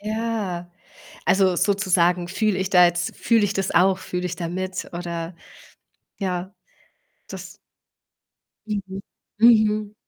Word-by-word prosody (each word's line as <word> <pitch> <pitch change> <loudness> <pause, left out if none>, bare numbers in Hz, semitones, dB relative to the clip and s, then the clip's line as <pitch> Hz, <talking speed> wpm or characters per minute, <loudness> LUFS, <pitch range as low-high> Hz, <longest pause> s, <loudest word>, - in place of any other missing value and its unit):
Ja. 210 -5 -3 0.5
Also, 190 -2 +3
sozusagen 180 -3 +2
fühle 210 +1 0
ich 190 0 -2
da 180 -2 +7
jetzt 175 0 -2
fühle 230 -3 +2
ich 205 - 0
das 195 -2 -1
auch? 190 +1 +4
Fühle 180 -1 -4
ich 180 -1 -5
da 170 0 -4
mit, 185 +1 -4
oder 170 0 -5 0.9
ja. 185 -1 -3 0.8
Das - - -9 1.1
Mhm. 195 -2 -4 0.4
Mhm. 215 -2 +4
190 Hz, 120 wpm, -23 LUFS, 175-210 Hz, 1.1 s, da